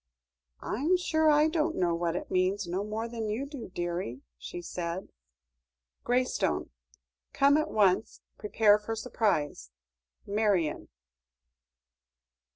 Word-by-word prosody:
"I'm 305 - +1
sure 315 -3 +2
I 300 +1 +5
don't 320 0 0
know 175 -2 +1
what 170 0 -1
it - - -5
means 185 +2 +1
no 180 +3 -2
more 215 +2 -3
than 230 -2 -4
you 230 +6 -2
do, 280 -7 -8
dearie," 175 -8 -4
she - - -7
said. 175 +1 -5 0.9
"Graystone. 245 - 0 0.6
"Come 280 +1 +5
at 310 +1 +1
once; 200 -1 +2 0.2
prepare 210 0 +4
for 225 +2 -4
surprise. 200 - -1 0.6
"MARION." 200 -7 0
210 Hz, 115 wpm, -29 LUFS, 175-255 Hz, 0.9 s, I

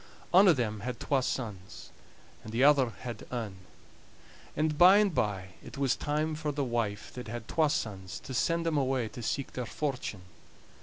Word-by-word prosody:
Ane 190 +3 +8
of 170 -6 +6
them 110 -3 -1
had 120 +3 -5
twa 140 -2 +1
sons, 105 -7 -5 0.5
and 110 - -8
the 120 +4 +1
other 140 -3 +5
had 115 -1 -8
ane; 110 -6 -4 1.0
and 155 0 +1
by 180 +5 +8
and 205 -3 +3
by 95 -7 -1
it - - -10
was 135 -2 +2
time 150 +2 -1
for 155 -1 -2
the 145 0 -1
wife 115 -5 -2
that 125 -2 -7
had 115 0 -6
twa 155 -2 +2
sons 95 -8 -3
to 130 - -8
send 165 +6 +1
them 160 -3 +1
away 130 -3 0
to 120 - -9
seeke 135 +4 -2
their 125 -2 -4
fortune. 130 -10 -3
130 Hz, 185 wpm, -30 LUFS, 110-150 Hz, 1.0 s, Ane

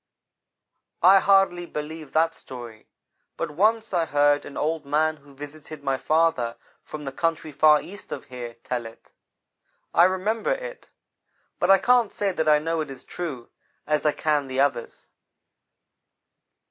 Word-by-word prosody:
"I 190 +2 +8
hardly 195 -3 +3
believe 155 -1 -7
that 165 +1 +3
story, 120 -7 -10 0.5
but 165 -2 -3
once 215 +6 +1
I 170 -2 +2
heard 145 0 +2
an 140 - -9
old 160 0 -1
man 155 +2 +1
who 140 -1 -19
visited 145 +1 -10
my 135 -1 0
father 155 -7 +1 0.2
from 150 -1 -8
the 135 - -4
country 165 +1 -2
far 150 +1 +5
east 205 +6 -11
of - - -6
here, 120 -3 -8
tell 120 -2 -3
it. 115 - -17 0.8
I 170 - +6
remembered 215 - 0
it. - - -9 0.7
But 175 - +1
I 195 - +8
can't 240 +2 +3
say 200 -1 -1
that 160 -3 0
I 150 - +6
know 165 +2 -1
it 155 - -5
is 130 -1 -9
true, 145 -9 -6 0.3
as 150 0 0
I 150 - +3
can 150 -2 0
the 130 0 -3
others. 135 -4 -1
155 Hz, 155 wpm, -24 LUFS, 140-175 Hz, 0.8 s, I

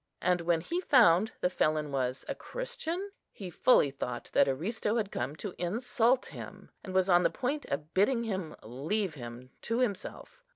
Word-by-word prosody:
and 180 0 +2
when 170 -1 +1
he 345 - -2
found 220 - +5
the - - +3
felon 155 -4 0
was 130 -1 -2
a - - -1
Christian, 400 -6 -5 0.2
he 185 -3 -8
fully 160 - +4
thought 125 -3 -5
that - - +5
Aristo 210 - -1
had 215 -4 -1
come 130 +5 -3
to 190 +3 -6
insult 235 +6 +1
him, - - -10
and 190 - -7
was 190 0 +4
on 175 -2 +5
the - - +3
point 280 +4 -2
of 150 +3 -4
bidding 230 +5 +3
him 190 -8 -3
leave 160 - -2
him 125 -1 -9
to 230 - -1
himself. 240 - -3
185 Hz, 175 wpm, -30 LUFS, 150-235 Hz, 0.2 s, found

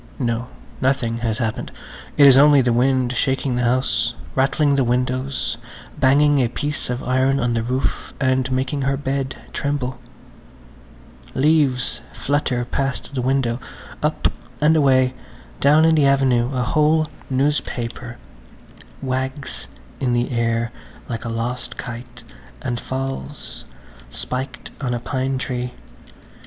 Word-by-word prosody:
No–nothing 120 0 -2
has 115 -2 -1
happened. 110 -2 -2 0.5
It 145 - +8
is 135 -2 +9
only 145 0 +7
the 120 -1 +2
wind 130 0 +2
shaking 130 0 0
the 125 - 0
house, 120 -1 +1 0.2
rattling 140 +2 +2
the 135 - +3
windows, 125 +1 -1 0.4
banging 145 +2 +5
a 125 - +3
piece 145 +5 -3
of 125 +1 -2
iron 130 +2 +2
on 120 0 +1
the 115 - +1
roof 125 +3 -2
and 130 -1 +1
making 130 +2 0
her 135 0 +1
bed 135 -1 -2 0.2
tremble. 140 -3 -2 1.4
Leaves 135 -4 +2 0.2
flutter 130 -4 0
past 135 +2 -2
the 130 - -1
window, 130 -2 +1 0.4
up - - +1 0.3
and 155 +2 +4
away; 130 -4 +4 0.5
down 150 +3 +5
in 165 - +5
the 150 -3 +4
avenue 130 -3 +3
a 130 -2 0
whole 155 +4 +3 0.2
newspaper 130 -3 -1 0.9
wags 130 +2 -3 0.3
in 125 -2 +1
the 120 +2 0
air 115 0 0 0.4
like 115 -1 -4
a - - -2
lost 115 +2 -3
kite 120 0 -8 0.4
and 120 -2 -3
falls, 135 +2 -5 0.4
spiked 130 +1 -5
on 125 -2 0
a - - -2
pine 130 +2 -1
tree. 125 -1 -3
130 Hz, 130 wpm, -21 LUFS, 120-135 Hz, 1.4 s, is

